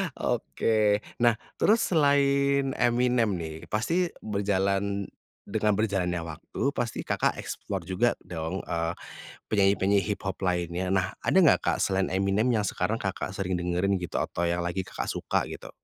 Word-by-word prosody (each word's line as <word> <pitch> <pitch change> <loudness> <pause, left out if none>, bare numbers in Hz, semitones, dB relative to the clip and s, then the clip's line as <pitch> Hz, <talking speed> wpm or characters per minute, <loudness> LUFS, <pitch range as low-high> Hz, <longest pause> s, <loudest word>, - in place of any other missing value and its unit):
Oke. 110 -3 +1 0.2
Nah, 120 -1 +4 0.2
terus 220 +2 +4
selain 140 -3 +3
Eminem 120 -1 +2
nih, 80 -3 -5
pasti 165 +12 +1 0.2
berjalan 100 -1 0 0.4
dengan 105 -1 +1
berjalannya 90 -5 0
waktu, 80 -2 -8
pasti 120 -2 -2
Kakak - - 0
explore 95 -5 -5
juga 95 +6 +2
dong, 85 +1 -4
eee, 85 0 -1 0.6
penyanyi-penyanyi 100 -1 +3
hiphop 95 -1 -5
lainnya. 90 -1 -1
Nah, 95 -1 +1
ada - - 0
nggak - - +6
Kak, - - 0
selain 95 -1 +1
Eminem 100 +5 +1
yang 110 -4 +2
sekarang 100 +2 -1
Kakak 95 -2 -4
sering 95 -2 -1
dengerin 90 +2 0
gitu 90 - -4
atau 85 0 -1
yang 85 0 -1
lagi 85 +2 -2
Kakak - - -5
suka - - -1
gitu? - - -8
100 Hz, 145 wpm, -27 LUFS, 90-115 Hz, 0.6 s, nggak